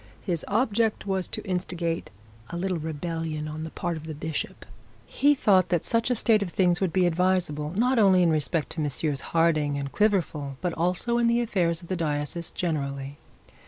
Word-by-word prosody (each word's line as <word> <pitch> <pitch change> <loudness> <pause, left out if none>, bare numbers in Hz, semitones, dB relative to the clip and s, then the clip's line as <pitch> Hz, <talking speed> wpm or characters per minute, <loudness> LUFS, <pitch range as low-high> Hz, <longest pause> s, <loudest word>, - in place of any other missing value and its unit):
His 175 -5 -1
object 220 -1 +1
was 190 -2 -1
to - - -4
instigate 175 -2 -2 0.4
a 170 - -5
little 180 -1 -1
rebellion 160 0 -3
on 155 +1 -5
the 160 - -5
part 170 +1 -3
of 160 0 -9
the 155 - -5
bishop. 155 +1 -4 0.4
He 290 +1 +3
thought 190 -8 +3
that 175 -3 0
such 230 +1 +1
a 250 - +2
state 220 -1 +3
of 200 - -2
things 175 0 +2
would 190 -3 +1
be 185 0 +3
advisable, 175 -4 +1
not 250 +2 +3
only 190 -3 +5
in 170 - +4
respect 155 +1 0
to 160 - -3
Messrs 145 -1 -1
Harding 155 -3 +1
and 140 -1 -4
Quiverful, 165 -10 0
but 180 -2 -2
also 180 +8 0
in 235 - +3
the 235 0 +3
affairs 175 -7 0
of - - -11
the 185 - -1
diocese 155 0 -2
generally. 140 -4 -3
170 Hz, 190 wpm, -26 LUFS, 155-190 Hz, 0.4 s, only